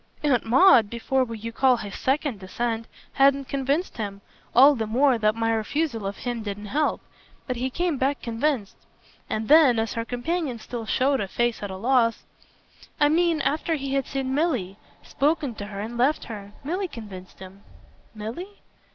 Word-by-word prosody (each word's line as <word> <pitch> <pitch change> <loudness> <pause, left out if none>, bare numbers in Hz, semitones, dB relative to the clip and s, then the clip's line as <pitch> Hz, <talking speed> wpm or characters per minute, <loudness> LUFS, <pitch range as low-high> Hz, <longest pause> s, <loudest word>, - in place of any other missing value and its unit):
Aunt 275 -5 +2
Maud, 255 - +6
before 255 +3 0
what 230 -3 -7
you 230 - -4
call 255 +1 +3
his 205 -3 -7
second 270 -4 -1
descent, 225 +4 -3 0.3
hadn't 275 0 +3
convinced 280 +5 -1
him 200 -3 -5 0.3
all 275 +4 +8
the 225 -5 -3
more 250 +2 +3
that 215 0 +2
my 225 0 0
refusal 225 0 -1
of 195 - -5
him 240 -2 -4
didn't 205 -1 -6
help. 300 +1 +1 0.4
But 255 -2 -3
he 255 +2 -1
came 335 0 -1
back 275 +2 +1
convinced." 235 -2 -1 0.5
And 220 0 -2
then 295 -6 +6
as 225 0 -1
her 230 - -2
companion 255 +3 -2
still 230 0 -7
showed 270 +3 +2
a 200 - -2
face 240 +4 -1
at 205 - -4
a 190 - -6
loss: 230 +1 +2 0.8
"I 295 - +5
mean 335 0 +2
after 305 +4 0
he 275 -2 -4
had 275 -2 0
seen 265 -1 -2
Milly, 255 - 0 0.3
spoken 290 -2 0
to 205 -1 -7
her 200 -1 -6
and 235 +3 -6
left 280 +5 +2
her. 205 -3 -8
Milly 365 +7 -2
convinced 205 - -10
him." 190 +1 -12 0.5
"Milly?" 250 - -7
245 Hz, 175 wpm, -25 LUFS, 220-285 Hz, 0.8 s, all